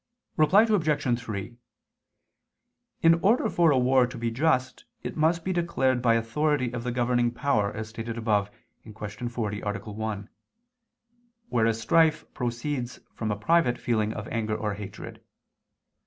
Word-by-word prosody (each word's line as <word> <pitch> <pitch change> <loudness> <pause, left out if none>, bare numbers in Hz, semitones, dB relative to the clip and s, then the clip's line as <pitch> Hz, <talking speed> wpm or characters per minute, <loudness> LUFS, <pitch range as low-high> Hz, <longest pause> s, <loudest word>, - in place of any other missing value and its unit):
Reply 180 +7 +5
Obj. 155 - +1
3: 110 0 -6 1.5
In 165 0 +7
order 215 +6 +3
for 170 -2 +4
a 140 - +4
war 130 0 +4
to 125 - -9
be 115 0 -2
just 130 -1 0 0.2
it - - -5
must 165 +2 +2
be 185 - 0
declared 135 -8 +1
by 115 -2 +4
authority 130 +2 0
of 120 -1 -4
the 125 - -2
governing 120 0 +1
power, 120 -5 0
as 110 0 -6
stated 115 +1 -6
above 105 -3 +1 0.3
(Q. 110 +2 -7
40, 105 -4 -3
A. 105 -1 -3
1); 105 0 -5 1.2
whereas 115 -1 +1
strife 155 +7 +3
proceeds 125 +1 -3
from 110 - -3
a 105 - 0
private 125 +1 +2
feeling 110 -3 0
of 110 -1 -6
anger 110 -2 -1
or 105 -1 -2
hatred. 100 -1 -9
120 Hz, 145 wpm, -27 LUFS, 110-145 Hz, 1.5 s, In